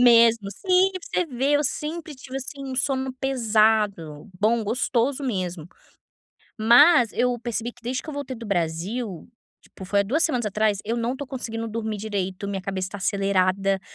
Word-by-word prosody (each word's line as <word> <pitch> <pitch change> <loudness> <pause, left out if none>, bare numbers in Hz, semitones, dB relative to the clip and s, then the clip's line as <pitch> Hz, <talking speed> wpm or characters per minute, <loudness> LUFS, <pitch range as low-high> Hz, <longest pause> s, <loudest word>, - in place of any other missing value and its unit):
Mesmo 230 -4 +5
sim, 370 - +2
pra 370 - -5 0.2
você - - -13
vê, 270 -1 -1
eu 290 - +1
sempre 310 +3 -4
tive, 260 0 -8
assim, 275 +1 -7
um 265 -1 -5
sono 265 0 0
pesado, 215 - +1
bom, 220 +1 +2
gostoso 250 +4 0
mesmo. 180 -8 -3 0.9
Mas 240 +3 +6
eu 245 0 +1
percebi 235 0 -3
que - - -22
desde 250 +2 -3
que - - -15
eu - - -7
voltei 280 -2 -5
do 230 - -9
Brasil, 180 +3 -2 0.3
tipo, 190 - -12
foi 200 +2 +2
há - - +3
2 295 +11 +1
semanas 250 -8 0
atrás, 210 0 +1
eu 230 +3 -1
não 235 +1 -1
estou 280 +2 -6
conseguindo 230 -3 -4
dormir 220 -1 -3
direito, 200 -2 -3
minha 195 -1 -3
cabeça 190 -1 -3
está 205 - -7
acelerada, 195 0 +1
230 Hz, 175 wpm, -24 LUFS, 200-260 Hz, 0.9 s, Mas